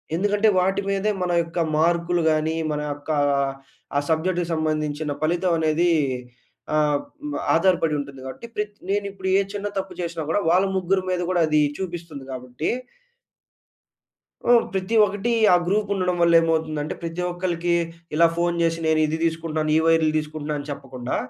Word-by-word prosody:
ఎందుకంటే, 205 +4 +2
వాటి 190 +2 +1
మీదే 200 +2 +1
మన 180 - -1
యొక్క 165 +1 -4 0.2
మార్క్‌లు 170 +2 +2
గాని, 155 +1 0 0.2
మన 150 0 -2
యొక్క 145 +2 -13 0.9
ఆ - - +5
సబ్జెక్ట్‌‌కి 170 +2 0
సంబంధించిన 155 -1 -1
ఫలితం 175 +2 +1
అనేది 160 +2 +2 0.9
ఆహ్, 150 -1 +2 0.5
ఆధారపడి 165 -2 +3
ఉంటుంది. 140 -1 -7
కాబట్టి 130 - -8
ప్రత్ 210 0 -3
నేను 200 +1 0
ఇప్పుడు 190 -1 -6
ఏ - - +4
చిన్న 205 0 -3
తప్పు 190 0 -3
చేసినా 170 -1 -4
కూడా 165 - +2
వాళ్ళ 185 +3 +4
ముగ్గురు 190 +1 +1
మీద 180 -1 0
గూడా 180 -2 +2
అది 155 0 +3 0.2
చూపిస్తుంది 170 -6 -6
గాబట్టి... 125 +3 -4 1.8
ఆ! - - +7 0.2
ప్రతి 190 +4 -2
ఒక్కటి 205 +3 -2 0.2
ఆ - - +8
గ్రూప్ 205 +3 +1
ఉండడం 180 -2 0
వల్ల 170 0 +4
ఏమవుతుందంటే, 160 -2 -1
ప్రతి 170 +1 -3
ఒక్కళ్ళకి 175 -1 -1 0.4
ఇలా 170 +2 +6
ఫోన్ 175 0 +1
జేశి. 165 0 +1
నేను 160 0 +3
ఇది 155 - -1
తీసుకుంటున్నాను. 160 -1 -1
ఈ - - +4
వైర్‌లు 160 -1 +4
తీసుకుంటున్నాను 150 -1 -4
అని 145 - -9
చెప్పకుండా. 125 -3 -5
165 Hz, 150 wpm, -23 LUFS, 155-185 Hz, 1.8 s, ఆ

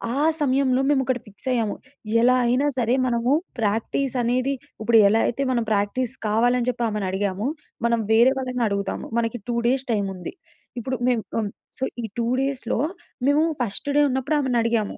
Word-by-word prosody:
ఆ 280 - 0 0.2
సమయంలో 270 -2 +2
మేము 285 -2 +3
ఒకటి 255 -2 -1
ఫిక్స్ 205 +5 -12
అయ్యాము. 230 -4 0 0.5
ఎలా 250 +2 +5
అయినా 255 +5 +2
సరే, 240 0 +2
మనము 240 +1 +1 0.3
ప్రాక్టీస్ 225 +5 0
అనేది 255 +3 +1 0.3
ఇప్పుడు 230 +1 +4
ఎలా 225 +2 +3
అయితే 275 +4 -1
మనం 240 -2 +1
ప్రాక్టీస్ 215 +4 0
కావాలి 235 +4 +3
అని 245 - -2
చెప్పి 240 -1 -2
ఆమెను 210 -2 -2
అడిగామో 200 +3 -1 0.4
మనం 235 -1 +1
వేరే 235 +4 +6
వాళ్ళని 255 -2 -2
అడుగుదాము. 200 -1 -3
మనకి 230 +1 -2
2 235 - 0
డేస్ 260 +1 +2
టైమ్ 200 -2 0
ఉంది. 180 -1 -7 0.5
ఇప్పుడు 260 +2 -3
మేము 235 -3 +1 0.2
ఆహ్, 205 -2 -3 0.3
సో, - - -2 0.2
ఈ - - -1
2 230 - 0
డేస్‌లో 265 -4 -1 0.5
మేము 290 +2 +4 0.2
ఫస్ట్ 235 +5 -3
డే 295 - +6
ఉన్నప్పుడు 265 +4 0
ఆమెని 255 -3 +1
అడిగాము. 230 -3 0
240 Hz, 175 wpm, -23 LUFS, 220-260 Hz, 0.5 s, వేరే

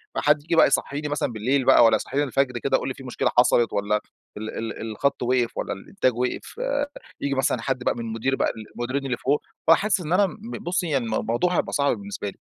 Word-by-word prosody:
فحد 150 0 +3
ييجي 165 +3 -1
بقى - - +7
يصحّيني 145 +2 -1
مثلًا 145 -4 -1
بالليل 125 +5 0
بقى 130 -2 +7
وإلّا 115 - +5
يصحيني 145 +2 -1
الفجر 135 -2 0
كده 135 +2 +1
يقول - - -4
لي: 130 - -2
"في 135 - -12
مشكلة 125 - -1
حصلت." 120 -2 +4
وإلّا 105 +1 +1 0.4
"ال 110 +1 -5
ال 115 -1 -3
ال 110 - -5
الخط 140 +6 0
وقف." 125 -1 +1
وإلّا - - -2
"الإنتاج 130 - -1
وقف." 125 - -3
آآ، - - 0 0.4
ييجي 140 -1 -1
مثلًا 135 0 0
حد 130 -2 -2
بقى - - +2
من - - -5
المدير 115 +3 -1
بقى - - +1 0.2
المديرين 130 +3 -2
اللي 125 - -1
فوق، 140 +5 +1 0.3
فأحس 200 +4 +4
إنّ 170 -1 -4
أنا 200 +2 +5
م 215 +5 -9
ب - - -4
بُصّي 175 0 -1
يعني 135 -5 +1
الم 110 - -2
موضوع 175 +10 +1
هيبقى - - -1
صعب 140 -1 +2
بالنسبة 200 - -5
لي. - - -20
135 Hz, 235 wpm, -24 LUFS, 120-150 Hz, 0.4 s, بقى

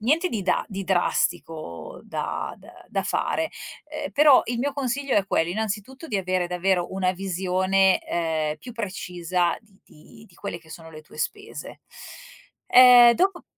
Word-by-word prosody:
niente 310 - +2
di 210 -4 -3
da 180 - 0
di 195 -1 -5
drastico 170 - -1
da - - -4
d - - -19 0.2
da - - -1
fare, - - -1 0.4
ehm, - - -5
però 290 0 +6
il 240 0 -2
mio 280 +3 -1
consiglio 275 0 -2
è 200 - +3
quello 165 -3 0
innanzitutto 220 - -4
di 215 - -1
avere 185 -2 -1
davvero 180 0 0
una 185 -1 0
visione, 190 +1 +1
ehm, 160 -2 -1
più 245 - -10
precisa 180 -5 -2
di 205 -3 -27
di 215 +8 -17
di 180 - -22
quelle 200 -3 -6
che 160 -1 -20
sono 160 -1 -10
le 155 - -11
tue 165 - -17
spese. - - -5 0.9
Ehm, 245 -1 +9
dopo 370 +2 0
190 Hz, 160 wpm, -24 LUFS, 175-235 Hz, 0.9 s, Ehm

